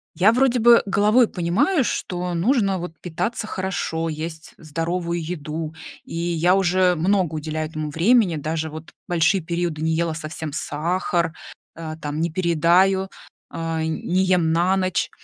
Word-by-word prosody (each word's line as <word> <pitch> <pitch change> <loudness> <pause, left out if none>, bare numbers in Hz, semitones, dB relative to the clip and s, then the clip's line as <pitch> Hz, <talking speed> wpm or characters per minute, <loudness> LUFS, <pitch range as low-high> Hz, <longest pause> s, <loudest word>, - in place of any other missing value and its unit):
Я, 195 +4 +5
вроде 250 0 +3
бы, 235 +1 +7
головой 210 +5 +4
понимаю, 200 - +1
что 180 -5 -3
нужно 195 +1 +1
вот 170 -2 -8
питаться 180 +7 -3
хорошо, 180 -4 -2
есть 160 +1 -6
здоровую 170 +2 -3
еду. 160 -1 -5 0.3
И - - -9
я 170 +2 +2
уже 185 -1 +3
много 175 -1 +1
уделяю 155 0 -3
этому 155 -1 -4
времени, 185 +3 +3
даже 155 +2 -3
вот 155 +1 -9 0.2
большие 170 +2 +2
периоды 170 -2 -3
не 160 0 +1
ела 165 0 0
совсем 155 0 -6
сахар, 170 +2 -1 0.4
а, 160 -1 -6
там, 150 -1 -4
не 170 - 0
передаю, 180 +3 +3 0.4
а, 165 -1 -3
не 170 +3 0
ем 180 -3 +2
на 175 +3 +2
ночь. 185 -1 0
170 Hz, 145 wpm, -22 LUFS, 160-185 Hz, 0.4 s, бы